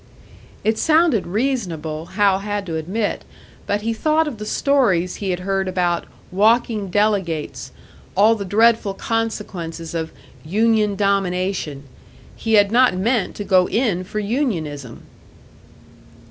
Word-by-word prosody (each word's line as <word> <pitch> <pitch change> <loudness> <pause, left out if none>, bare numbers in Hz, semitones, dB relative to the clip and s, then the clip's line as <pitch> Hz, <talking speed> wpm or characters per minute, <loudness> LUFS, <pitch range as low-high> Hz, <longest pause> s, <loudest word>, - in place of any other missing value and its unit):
It 220 0 +1
sounded 315 - +3
reasonable, 175 - -2
Hal 200 -2 +4
had 205 0 -3
to 165 -3 -4
admit; 190 +7 -2 0.4
but 205 +1 -1
he 230 +1 0
thought 310 +7 +1
of 250 -8 -6
the 210 - -6
stories 215 -11 +1
he 200 - -3
had 180 0 -2
heard 195 0 -1
about 180 -2 0 0.3
"walking 215 +1 +2
delegates," 190 -6 -1 0.5
all 215 +3 +6
the 215 -3 -4
dreadful 215 0 +3
consequences 190 -9 -4
of 160 -1 -3 0.3
"union 210 +4 +2
domination." 185 -6 -1 0.5
He 225 - -2
had 205 -1 +5
not 250 -4 +4
meant 220 +1 0
to 205 - -5
go 185 -2 +3
in 215 -7 0
for 190 - -7
unionism! 180 - -3
200 Hz, 130 wpm, -20 LUFS, 180-225 Hz, 0.5 s, all